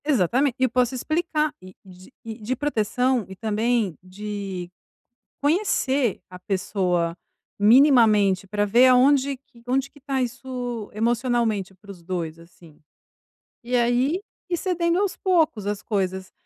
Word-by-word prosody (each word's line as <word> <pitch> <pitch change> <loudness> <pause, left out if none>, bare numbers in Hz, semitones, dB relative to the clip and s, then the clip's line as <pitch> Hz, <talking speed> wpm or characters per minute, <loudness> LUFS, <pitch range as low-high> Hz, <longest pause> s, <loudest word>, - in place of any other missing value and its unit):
Exatamente, 260 - +2
e - - +1
eu 260 - +3
posso 250 +1 +1
explicar 310 +2 -1
e 185 0 -13
de 185 +3 -15
e 220 -1 -7
de 240 +5 -2
proteção 250 -2 0
e 190 - -9
também 220 -2 0
de 190 -1 -6 0.7
conhecer 285 - +1
a 180 - -10
pessoa 180 -3 -1 0.4
minimamente 215 -5 +5
para 205 +1 0
ver 235 +5 +5
aonde 270 +2 +4
que 245 -2 -23
onde 270 +2 0
que 290 - -19
está 270 -2 -2
isso 245 -2 -5
emocionalmente 230 -3 0
para 200 +2 -16
os 180 -3 -11
2, 165 -2 -4
assim. 165 -2 -18 0.8
E 245 +1 -2
aí, 245 +7 +2 0.3
e 350 - 0
cedendo 345 -1 0
aos 400 -2 0
poucos 320 - +1
as 205 0 -2
coisas. 190 -2 -2
235 Hz, 140 wpm, -24 LUFS, 195-265 Hz, 0.8 s, minimamente